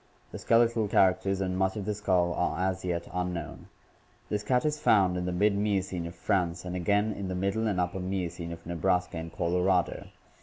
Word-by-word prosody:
The - - -7
skeletal 115 -1 +3
characters 95 0 +2
and 90 -1 -1
much 95 +2 0
of 100 - -4
the 105 - -1
skull 90 -4 +1
are 90 - -1
as 95 0 -3
yet 85 -2 -2
unknown. 90 -4 -4 0.6
This 105 - -1
cat 125 +6 +1
is 150 0 0
found 95 -9 +4
in 90 0 -2
the 90 - -1
mid 100 +3 +2
Miocene 95 -4 -1
of 85 - -9
France 90 -3 -1
and 90 0 -4
again 105 +4 +1
in 100 -1 -5
the 90 - -3
Middle 100 +4 0
and 100 -4 0
Upper 90 +1 -1
Miocene 90 -2 -3
of 85 0 -9
Nebraska 90 +1 0
and 80 0 -6
Colorado. 90 +1 0
95 Hz, 195 wpm, -29 LUFS, 90-100 Hz, 0.6 s, found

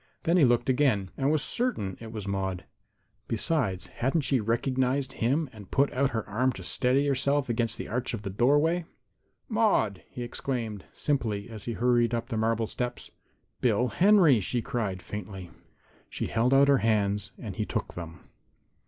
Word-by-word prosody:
Then 170 - +2
he 170 -6 +6
looked 120 -1 +2
again 125 -8 +2
and 135 +2 +1
was 155 -2 +2
certain 215 - 0
it 115 -1 -8
was 105 -3 -6
Maude. 95 -2 -2 0.6
Besides, 115 - 0
hadn't 135 +6 -1
she 135 -2 +1
recognized 130 +4 0
him 140 +7 0
and 105 -4 -12
put 140 +1 +2
out 135 +1 +2
her 115 -3 -3
arm 125 +5 +1
to 95 - -9
steady 125 +10 +1
herself 140 0 +1
against 115 -1 0
the - - -5
arch 125 +1 -2
of 105 - -8
the 100 - -4
doorway? 145 - +2 0.6
"Maude!" 210 - +1
he 125 - -6
exclaimed, 120 -4 -4
simply, 115 -7 -2
as 110 -2 -8
he 120 - -2
hurried 120 0 +2
up 115 - -4
the 115 - -2
marble 115 +1 +1
steps. 125 +2 -5 0.5
"Bill 120 +1 +2
Henry!" 180 - +5
she 120 +5 -1
cried, 110 -8 -3
faintly. 95 -3 -7 0.6
She - - -3
held 115 +3 +1
out 135 +1 +6
her 140 -2 +5
hands 105 -2 +1
and 105 -5 -7
he 105 - -1
took - - -3
them. 85 -2 -8
120 Hz, 170 wpm, -28 LUFS, 105-135 Hz, 0.6 s, he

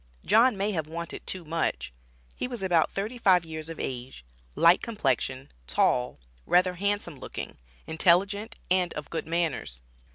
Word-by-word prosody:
John 235 0 +5
may 200 +2 0
have 160 -6 -2
wanted 170 +1 -7
too 185 -3 -4
much. 160 - -2 0.4
He - - -2
was 245 -5 -5
about 175 -4 +3
thirty 215 +5 -4
five 185 -6 +4
years 160 0 -6
of 165 - -7
age, 125 - -5 0.3
light 170 +2 +6
complexion 135 - -2 0.2
tall - - +1 0.3
rather 180 +1 +4
handsome 195 -5 -2
looking, - - -7 0.3
intelligent, 190 +6 +2 0.2
and 180 -1 +3
of 150 - -6
good 165 - -3
manners. 160 - -1
170 Hz, 150 wpm, -27 LUFS, 155-195 Hz, 0.4 s, light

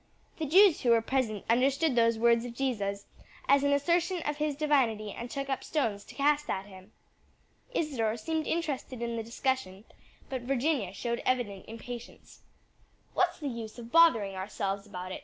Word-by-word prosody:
The 315 - -1
Jews 375 +3 +6
who 245 - +1
were 230 -1 +5
present 230 -6 -1
understood 270 +6 +2
those 230 -1 +3
words 235 0 +4
of 240 -1 -7
Jesus 205 -7 -2 0.4
as 280 0 +5
an 285 - +3
assertion 340 +5 +1
of 295 0 -2
his 300 -1 -1
divinity 255 -8 +1
and 235 +4 -7
took 275 +2 -4
up 270 -1 -2
stones 225 -10 -1
to - - -13
cast 295 +1 +2
at 190 0 -2
him." 190 0 -14 0.8
Isadore 235 -8 0
seemed 315 +7 -2
interested 280 -7 -2
in 235 0 -2
the 230 - -2
discussion, 230 -4 -2 0.4
but 260 -2 -4
Virginia 255 - 0
showed 235 +4 -3
evident 225 -7 -1
impatience. 235 +2 -9 0.7
"What's 355 -1 +1
the 295 - -5
use 230 -3 -6
of 235 -1 -9
bothering 240 -13 +5
ourselves 195 +1 -3
about 185 -2 -7
it?" - - -5
245 Hz, 170 wpm, -30 LUFS, 215-285 Hz, 0.8 s, Jews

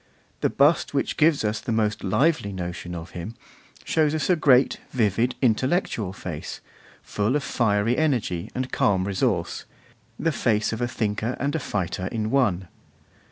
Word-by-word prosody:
The - - +1
bust 145 +1 +2
which 140 - 0
gives 155 -6 +3
us 105 +1 0
the 125 - -4
most 110 -2 0
lively 130 - +1
notion 90 -1 -5
of 85 0 -8
him 90 +7 -7 0.5
shows 155 -1 +1
us 155 +4 +1
a - - +5
great, 135 -5 +4
vivid, 115 +1 +1
intellectual 125 - +1
face, 90 -5 -6 0.4
full 105 +6 -1
of 150 - 0
fiery 110 -1 +1
energy 115 - 0
and 130 0 -3
calm 95 -2 +2
resource, 95 -1 -1 0.5
the 165 - 0
face 110 -6 +1
of 115 - -4
a 120 - +1
thinker 110 +1 -2
and 140 +2 -1
a 160 - 0
fighter 95 - -3
in 110 0 -2
one. 100 -10 +1
110 Hz, 160 wpm, -24 LUFS, 100-140 Hz, 0.5 s, a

